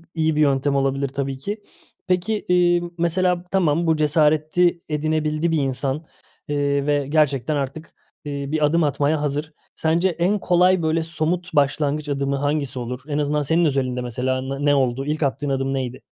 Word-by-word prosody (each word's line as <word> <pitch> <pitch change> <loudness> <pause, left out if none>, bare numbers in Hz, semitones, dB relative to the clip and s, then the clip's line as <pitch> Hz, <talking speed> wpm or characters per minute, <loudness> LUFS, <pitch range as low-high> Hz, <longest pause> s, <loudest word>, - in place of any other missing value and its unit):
iyi 160 -1 +1
bir 155 - +2
yöntem 140 -1 +2
olabilir 135 0 0
tabii 135 0 -3
ki. 205 +10 -5 0.5
Peki, 180 +3 +1 0.2
eee, 175 -1 +4 0.2
mesela, 175 +1 +1
tamam, 170 -3 +2
bu 160 - +3
cesareti 155 +3 +2
edinebildi 155 +1 0
bir 165 - +2
insan, 135 +3 -2 0.4
eee, 140 -1 0
ve 145 -1 +1
gerçekten 150 -2 +1
artık, 145 +3 -4 0.3
eee, 140 -1 -4
bir 155 0 +1
adım 165 +3 +2
atmaya 145 +1 +1
hazır. 150 +2 -2 0.2
Sence 165 +3 +1
en 180 +4 0
kolay 180 0 +3
böyle 160 +1 +1
somut 165 +2 -2
başlangıç 145 +1 +1
adımı 140 0 -1
hangisi 145 -2 -1
olur? 125 +1 -5
En 145 -1 -2
azından 150 0 0
senin 160 +4 +2
özelinde 130 -4 0
mesela 125 +2 -2
ne 135 +2 -4
ne 145 0 +4
oldu? 130 0 0
İlk 150 +1 -1
attığın 140 +1 -1
adım 135 0 -1
neydi? 130 -1 -4
150 Hz, 165 wpm, -22 LUFS, 140-165 Hz, 0.5 s, eee